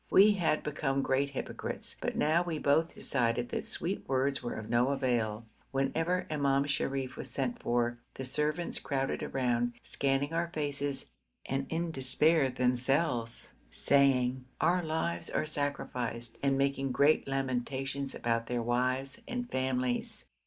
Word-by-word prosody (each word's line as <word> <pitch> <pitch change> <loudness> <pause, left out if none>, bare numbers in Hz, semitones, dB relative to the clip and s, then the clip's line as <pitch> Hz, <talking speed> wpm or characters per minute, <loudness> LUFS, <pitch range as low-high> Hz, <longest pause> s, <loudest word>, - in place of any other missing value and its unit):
We 205 +2 +7
had 175 -6 +1
become 140 -2 0
great 140 +1 +1
hypocrites, 135 - -5
but - - -2
now 160 +3 +3
we 170 -3 -2
both 150 +3 +2
decided 120 -2 0
that - - -3
sweet 185 +4 -2
words 135 +1 +1
were 120 - -4
of 110 0 -6
no 120 +2 +3
avail. 120 -5 0 0.2
Whenever 165 +7 0
Imam 140 -2 +2
Sharif 135 -2 -1
was - - -5
sent 130 -3 -2
for, 120 0 0 0.2
the 130 - -5
servants 150 +5 -1
crowded 135 -2 -1
round, 120 -2 +1
scanning 140 +2 0
our 170 +1 +1
faces, 145 -4 -3 0.3
and 135 +1 -2
in 165 +1 -1
despair 135 +2 +3
themselves, 125 0 0 0.2
saying 130 - +3 0.2
'our 175 +4 +3
lives 160 +1 -2
are - - 0
sacrificed,' 125 -6 -3
and 135 -1 +2
making 135 -1 +1
great 140 +4 +4
lamentations 135 +1 -2
about 115 -1 0
their 120 -1 -1
wives 130 +3 0
and 245 -1 -4
families. 130 -1 -1
135 Hz, 140 wpm, -31 LUFS, 125-150 Hz, 0.3 s, We